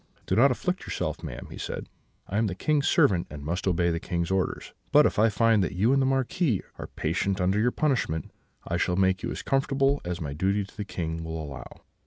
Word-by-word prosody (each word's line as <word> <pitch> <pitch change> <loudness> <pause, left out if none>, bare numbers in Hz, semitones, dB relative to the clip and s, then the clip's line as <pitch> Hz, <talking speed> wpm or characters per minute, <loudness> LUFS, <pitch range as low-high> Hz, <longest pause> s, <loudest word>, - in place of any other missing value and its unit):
"'Do 95 - 0
not 125 +6 +6
afflict 180 +8 -1
yourself, - - -3
madam,' - - -7
he - - -8
said: - - -5 0.4
'I 100 - -3
am 110 - +2
the 90 - -3
King's 150 +6 +1
servant, 90 -4 +3
and 70 -1 -8
must 90 +5 -2
obey 85 -1 +2
the 85 - -1
King's 85 +1 -2
orders; 95 -1 -1 0.2
but - - +7
if - - +1
I 110 +1 +5
find 110 -1 +3
that - - -2
you 110 +8 +3
and 135 - +3
the 130 - +2
Marquis 135 - +1 0.2
are - - -5
patient 95 +5 -1
under 95 +3 +2
your 120 +3 +3
punishment, 125 - -1 0.4
I 85 - 0
shall 90 0 +1
make 95 -1 +2
you - - -3
as - - -5
comfortable 135 +1 +1
as 90 0 -3
my 75 -5 -4
duty 95 +6 +1
to 100 - -14
the 105 -2 -4
King 80 -4 -4
will 80 0 -4
allow.' 70 -3 -8
95 Hz, 230 wpm, -27 LUFS, 85-125 Hz, 0.4 s, but